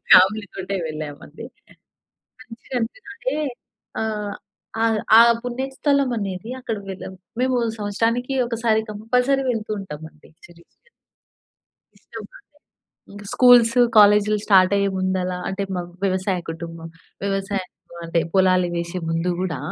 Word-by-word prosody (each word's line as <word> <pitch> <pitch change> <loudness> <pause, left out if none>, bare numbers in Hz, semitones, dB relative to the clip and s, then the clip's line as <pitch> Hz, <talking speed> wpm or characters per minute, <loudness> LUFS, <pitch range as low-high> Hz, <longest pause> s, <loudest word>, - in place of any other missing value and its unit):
ఫ్యామిలీతోటే 195 0 +4
వెళ్ళాం 155 -2 -6
అండి, - - -11 1.0
మంచిగా 250 +1 -9
అనిపిస్తదండి. 405 - -4 0.7
ఆహ్, 210 -2 -3 0.5
అ - - +3 0.3
ఆ - - +10 0.2
పుణ్యస్థలం 270 +3 0
అనేది, 195 +1 -5
అక్కడ 230 -3 -3
వెళ్ళాం. 190 0 -7 0.3
మేము 255 -1 +1 0.2
సంవత్సరానికి 230 +5 -1
ఒకసారి 230 -2 +1
కంపల్సరీ 250 +6 0
వెళ్తూ 220 -2 -5
ఉంటామండి 160 -4 -11 0.2
శ్రీశైలం. 175 - -22 1.1
ఇష్టమండి. - - -12 0.7
ఇంకా 205 0 -10
స్కూల్సు, 245 -1 +6 0.2
కాలేజీలు 210 0 +6
స్టార్ట్ 190 -1 +5
అయ్యే 200 0 +1
ముందలా, 185 -1 -1
అంటే 195 +1 -3
మా 180 - -1 0.2
వ్యవసాయ 190 -1 0
కుటుంబం. 165 0 -8 0.4
వ్యవసాయం 195 -1 -2 0.4
అంటే 165 0 +1
పొలాలు 185 -2 +3
వేసే 170 +1 -3
ముందు 165 +2 0
కూడా 175 -5 -2
205 Hz, 110 wpm, -22 LUFS, 185-230 Hz, 1.1 s, ఆ